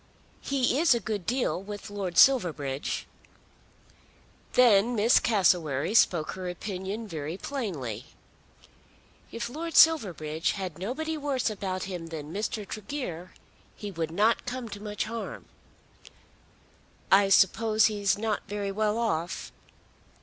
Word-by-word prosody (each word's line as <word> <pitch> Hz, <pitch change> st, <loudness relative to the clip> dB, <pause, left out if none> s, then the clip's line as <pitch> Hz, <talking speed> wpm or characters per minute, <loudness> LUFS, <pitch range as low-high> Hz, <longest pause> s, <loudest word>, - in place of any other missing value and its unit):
He 270 Hz, -1 st, +1 dB
is 320 Hz, -6 st, +5 dB
a -, -, 0 dB
good 205 Hz, -3 st, -4 dB
deal 245 Hz, -6 st, 0 dB
with 205 Hz, +1 st, -8 dB
Lord 190 Hz, -4 st, -4 dB
Silverbridge." 155 Hz, -, +3 dB, 1.5 s
Then 240 Hz, -1 st, +5 dB
Miss 225 Hz, +3 st, +5 dB
Cassewary 175 Hz, -, +2 dB
spoke 170 Hz, -8 st, +3 dB
her 185 Hz, -1 st, -5 dB
opinion 195 Hz, +4 st, -5 dB
very 160 Hz, -1 st, -5 dB
plainly. 150 Hz, -, -5 dB, 1.2 s
"If 235 Hz, 0 st, -4 dB
Lord 320 Hz, +6 st, -6 dB
Silverbridge 175 Hz, -, +4 dB
had 185 Hz, -5 st, -5 dB
nobody 310 Hz, -, -3 dB
worse 275 Hz, -6 st, -1 dB
about 190 Hz, -2 st, -4 dB
him 180 Hz, -3 st, -6 dB
than 160 Hz, -1 st, -7 dB
Mr. 210 Hz, 0 st, -3 dB
Tregear 205 Hz, -, -6 dB, 0.4 s
he 205 Hz, -1 st, -7 dB
would 165 Hz, -3 st, -3 dB
not 210 Hz, +9 st, +1 dB
come 250 Hz, -1 st, -4 dB
to 205 Hz, -, -7 dB
much 210 Hz, -1 st, -3 dB
harm." 230 Hz, 0 st, -6 dB, 1.7 s
"I 195 Hz, 0 st, +6 dB
suppose 215 Hz, +3 st, +4 dB
he's 205 Hz, -3 st, +1 dB
not 215 Hz, 0 st, -1 dB
very 205 Hz, -1 st, -3 dB
well 210 Hz, +2 st, 0 dB
off." 175 Hz, -7 st, -2 dB
205 Hz, 120 wpm, -28 LUFS, 180-230 Hz, 1.7 s, I